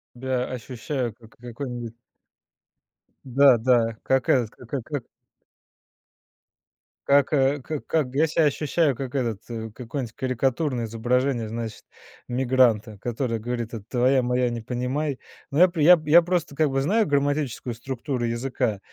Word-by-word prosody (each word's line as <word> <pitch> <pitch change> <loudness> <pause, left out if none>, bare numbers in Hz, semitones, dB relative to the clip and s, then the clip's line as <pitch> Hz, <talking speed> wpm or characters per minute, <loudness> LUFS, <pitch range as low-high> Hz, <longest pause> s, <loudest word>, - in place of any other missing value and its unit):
Я 125 0 -1
ощущаю, 125 0 -4
как 115 +3 -19
какой-нибудь 120 -1 -6 1.3
Да 135 0 +6
да, 115 -1 +2
как 130 -1 +1
этот 120 -5 +3
к 125 - -15 0.2
как 145 -1 -4 2.0
как, 140 +1 +4
э, 140 0 +2
как 150 +2 -5
как 140 -5 -1
я 155 +3 +4
себя 160 0 +2
ощущаю 150 0 +1
как 130 +2 -6
этот, 115 -7 -1
э, 110 -1 -5
какое-нибудь 120 -1 -5
карикатурное 130 0 -1
изображение, 120 +2 0
значит, 115 -1 -5 0.4
мигранта, 120 -4 +2
который 120 0 -2
говорит: 120 0 -4
"Это 110 - -7
твоя 130 +1 +2
моя, 125 0 +1
не 120 -1 -4
понимай". 130 +4 -2 0.3
Но 140 - 0
я 180 - +8
при 170 -4 -2
я, 175 +1 +7
я 165 +3 +7
просто 175 -4 -1
как 155 -1 +2
бы 135 0 +1
знаю 210 +9 +2
грамматическую 145 - -1
структуру 125 +1 -4
языка, 115 -3 -1
125 Hz, 140 wpm, -24 LUFS, 120-140 Hz, 2.0 s, я